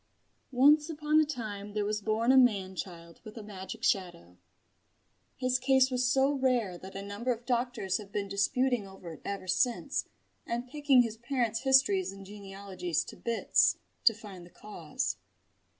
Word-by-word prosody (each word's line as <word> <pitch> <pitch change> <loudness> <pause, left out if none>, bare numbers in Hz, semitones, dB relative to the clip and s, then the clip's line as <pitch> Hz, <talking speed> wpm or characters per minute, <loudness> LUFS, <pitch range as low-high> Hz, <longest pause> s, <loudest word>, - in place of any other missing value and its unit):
Once 295 +5 +5
upon 305 -1 +2
a 310 - +4
time 210 -8 -6
there 210 -1 -1
was 210 0 -2
born 220 +4 +1
a - - +5
man 200 -7 +2
child 170 -2 -8
with 215 0 -11
a 220 - -7
magic 200 +2 -8
shadow. 175 - -1 1.0
His 255 0 +1
case 265 0 +3
was 250 -1 +1
so 270 +1 +3
rare 250 -9 0
that 190 +1 -11
a 195 - -5
number 205 +5 -3
of 235 0 -4
doctors 240 -6 -1
have 205 -2 -11
been 200 -1 -2
disputing 215 +3 0
over 190 -3 -10
it - - -13
ever 200 -2 -5
since 230 +6 0 0.4
and 240 +2 -3
picking 280 -2 +4
his 225 -2 -5
parents' 235 -2 -1
histories 275 - +3
and 195 0 -11
genealogies 195 -4 -4
to - - -10
bits, 235 -1 +2 0.3
to 225 - +6
find 200 -5 -11
the 175 - -14
cause. 175 -6 -4
220 Hz, 165 wpm, -30 LUFS, 195-255 Hz, 1.0 s, to